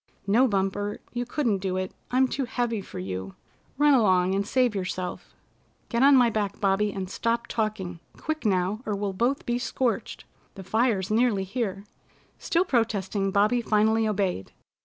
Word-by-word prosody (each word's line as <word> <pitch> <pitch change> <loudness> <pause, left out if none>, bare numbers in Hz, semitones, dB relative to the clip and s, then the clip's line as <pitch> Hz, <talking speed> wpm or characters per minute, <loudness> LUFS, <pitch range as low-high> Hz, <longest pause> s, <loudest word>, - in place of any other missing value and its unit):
"No, 230 +7 +4
Bumper, 205 0 -1
you 245 0 -3
couldn't 240 -7 0
do 185 -1 -2
it. 185 0 -3 0.2
I'm 260 +1 +3
too 270 +1 -2
heavy 235 -3 -2
for - - -10
you. 95 +1 -5 0.4
Run 295 0 +5
along 190 -7 +3
and 200 +1 -1
save 250 -2 +2
yourself." 185 -2 -4 0.5
"Get 235 0 0
on 275 +1 +7
my 245 -3 +5
back, 205 -2 -2
Bobby, 205 +1 +2
and 190 -1 -4
stop 235 +4 -1
talking! 210 -7 -3 0.2
Quick 315 0 -3
now, 195 +1 +1
or 210 - 0
we'll 200 -1 -2
both 245 +8 0
be 240 0 0
scorched. 250 -1 -2 0.3
The 195 - -8
fire's 215 -1 +1
nearly 220 -3 +2
here." 195 -1 -3 0.6
Still 350 +2 +1
protesting, 210 - 0
Bobby 210 +5 +2
finally 220 0 +2
obeyed. 195 - -1
210 Hz, 160 wpm, -26 LUFS, 195-240 Hz, 0.6 s, on